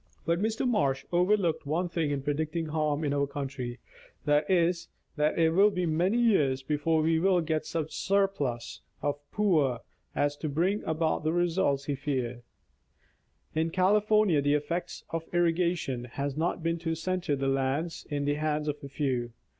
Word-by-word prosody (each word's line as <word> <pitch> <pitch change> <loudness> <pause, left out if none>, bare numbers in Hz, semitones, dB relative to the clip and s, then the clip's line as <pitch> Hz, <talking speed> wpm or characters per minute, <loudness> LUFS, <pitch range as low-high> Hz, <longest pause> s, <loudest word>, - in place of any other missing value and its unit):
But 170 +2 +1
Mr. 220 +4 0
Marsh 140 - +1
overlooked 180 -3 +2
one 170 +5 0
thing 165 -3 -1
in 140 -2 -2
predicting 155 +3 -1
harm 150 -1 0
in 145 -2 0
our 140 0 +1
country; 135 -3 -5 0.5
that 150 0 +2
is, 170 -2 +2 0.3
that 150 0 +1
it 165 -1 +4
will 195 +5 +5
be 180 -3 -1
many 175 +7 +1
years 150 - +3
before 155 +2 +1
we 160 0 +3
will 185 +1 +3
get 155 -2 -1
such 160 -2 -2
a - - -10
surplus 170 -12 -1 0.2
of 145 0 0
poor 155 - +2 0.3
as 145 0 +1
to 155 - -3
bring 180 +8 0
about 160 0 0
the 155 - +1
result 170 -5 +1
he 145 - -1
feared. 130 -4 -3 1.1
In 160 +1 +1
California, 205 -1 +3
the 145 +1 +2
effect 170 +4 -3
of 165 0 -4
irrigation 170 -7 +1
has 140 +3 -4
not 165 +1 -1
been 165 0 0
to 165 -1 -2
center 175 -2 -1
the 135 0 -2
land 135 +5 -1
in 145 -1 -1
the 145 - +2
hands 150 -1 0
of 150 0 -3
a 140 - -7
few. 130 -4 -2
155 Hz, 170 wpm, -29 LUFS, 145-175 Hz, 1.1 s, will